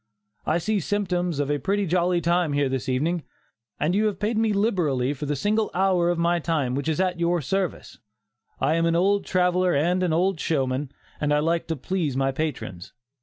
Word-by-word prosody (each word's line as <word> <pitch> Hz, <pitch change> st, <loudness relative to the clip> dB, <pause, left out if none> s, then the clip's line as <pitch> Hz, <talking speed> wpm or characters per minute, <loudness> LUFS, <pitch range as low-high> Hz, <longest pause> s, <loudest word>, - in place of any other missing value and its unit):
I 160 Hz, -, +2 dB
see 205 Hz, +5 st, 0 dB
symptoms 180 Hz, -3 st, -1 dB
of 145 Hz, 0 st, 0 dB
a 145 Hz, -, 0 dB
pretty 200 Hz, +3 st, 0 dB
jolly 175 Hz, 0 st, +1 dB
time 170 Hz, -2 st, +1 dB
here 145 Hz, -1 st, +2 dB
this 130 Hz, +1 st, -3 dB
evening, 160 Hz, +7 st, 0 dB, 0.6 s
and 155 Hz, +4 st, +1 dB
you 210 Hz, +3 st, +2 dB
have 205 Hz, -3 st, -2 dB
paid 215 Hz, +2 st, 0 dB
me 220 Hz, 0 st, +2 dB
liberally 170 Hz, -, +1 dB
for 145 Hz, +1 st, -6 dB
the 145 Hz, -, 0 dB
single 210 Hz, +8 st, 0 dB
hour 185 Hz, -2 st, +2 dB
of 175 Hz, -, 0 dB
my 170 Hz, +1 st, +2 dB
time 150 Hz, -6 st, -1 dB
which 140 Hz, +4 st, -2 dB
is 160 Hz, -, -1 dB
at 180 Hz, -2 st, 0 dB
your 170 Hz, +1 st, +1 dB
service. 185 Hz, +4 st, -3 dB, 0.6 s
I 155 Hz, -, +2 dB
am 165 Hz, 0 st, +2 dB
an 165 Hz, -, +1 dB
old 195 Hz, +3 st, +2 dB
traveller 180 Hz, -1 st, +2 dB
and 175 Hz, +6 st, +1 dB
an 180 Hz, -2 st, +1 dB
old 180 Hz, +2 st, +1 dB
showman, 135 Hz, -3 st, -1 dB, 0.3 s
and 150 Hz, -1 st, 0 dB
I 150 Hz, -, +4 dB
like 165 Hz, +3 st, 0 dB
to 165 Hz, -, -1 dB
please 155 Hz, -2 st, -2 dB
my 135 Hz, 0 st, +1 dB
patrons. 135 Hz, -, -5 dB
170 Hz, 205 wpm, -24 LUFS, 145-185 Hz, 0.6 s, I